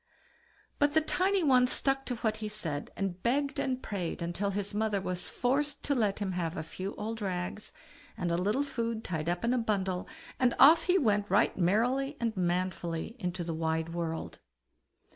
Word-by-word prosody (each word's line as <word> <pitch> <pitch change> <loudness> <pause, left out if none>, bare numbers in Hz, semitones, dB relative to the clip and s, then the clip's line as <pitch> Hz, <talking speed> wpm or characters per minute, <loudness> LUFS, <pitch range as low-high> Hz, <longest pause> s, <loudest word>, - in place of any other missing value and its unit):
But 290 0 +3
the 315 - +5
tiny 375 +4 +1
one 255 -4 +5
stuck 270 +1 +1
to 245 - -1
what 225 -2 -1
he 215 -1 -4
said, 165 -9 -3
and 190 -2 -2
begged 280 +4 0
and 260 -1 -1
prayed 185 -5 -3 0.2
till 200 +3 -1
his 200 0 -2
mother 210 -1 +1
was 185 -1 -3
forced 285 +4 0
to 285 - +1
let 215 -6 +1
him 200 -2 -2
have 175 -1 -2
a 160 - -2
few 185 +5 -6
old 225 +1 -4
rags, 185 +1 -3 0.5
and 175 -4 -1
a - - +2
little 210 +10 +1
food 230 -5 -3
tied 160 -2 -2
up 175 +5 -1
in 240 - +2
a 255 - +2
bundle, 190 -5 -1 0.3
and 250 -2 +3
off 320 +4 +8
he 370 0 +4
went 210 - +2
right 200 +5 +3
merrily 245 - +1
and 230 -2 -1
manfully 180 +1 -1
into 180 -2 -2
the 165 -1 -3
wide 160 0 -1
world. 165 -1 -4
210 Hz, 185 wpm, -30 LUFS, 180-250 Hz, 0.5 s, off